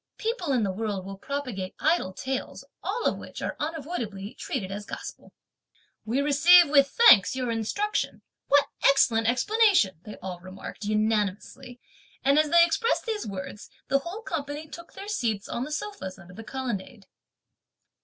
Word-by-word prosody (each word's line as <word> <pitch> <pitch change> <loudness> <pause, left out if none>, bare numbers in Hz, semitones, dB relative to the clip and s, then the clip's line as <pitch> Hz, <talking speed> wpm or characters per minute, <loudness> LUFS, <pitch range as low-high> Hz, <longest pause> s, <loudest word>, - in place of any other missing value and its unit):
People 440 - -2
in 250 -4 +2
the 195 - 0
world 200 -1 -3
will 195 0 -8
propagate 250 -10 -4
idle 315 - +1
tales, 260 +7 -5 0.2
all 480 - -3
of - - +1
which - - -9
are - - -3
unavoidably 275 - -4
treated 195 -8 -4
as 205 +1 -5
gospel!" - - -9 0.7
"We 240 +5 0
receive 325 +4 +6
(with 280 -2 +5
thanks) 260 - +6
your 250 -2 -2
instructions; 315 - -2 0.2
what 285 0 +5 0.2
excellent 230 -5 +4
explanation!" 365 - +3
they 210 +3 -9
all 185 -2 -7
remarked 185 +3 -9
unanimously, 215 +4 -1 0.4
and 280 +2 +4
as 310 -1 +2
they 340 +1 +7
expressed 460 +8 0
these 440 - -3
words, 195 +1 -7 0.2
the 275 +1 +3
whole 360 +10 -7
company 295 -3 -4
took 340 +2 -11
their 400 - -9
seats 230 - -1
on 240 - -3
the 300 - -8
sofas 305 - -5
under 180 -1 -14
the 225 - -9
colonnade. 235 -3 -5
260 Hz, 155 wpm, -26 LUFS, 205-320 Hz, 0.7 s, they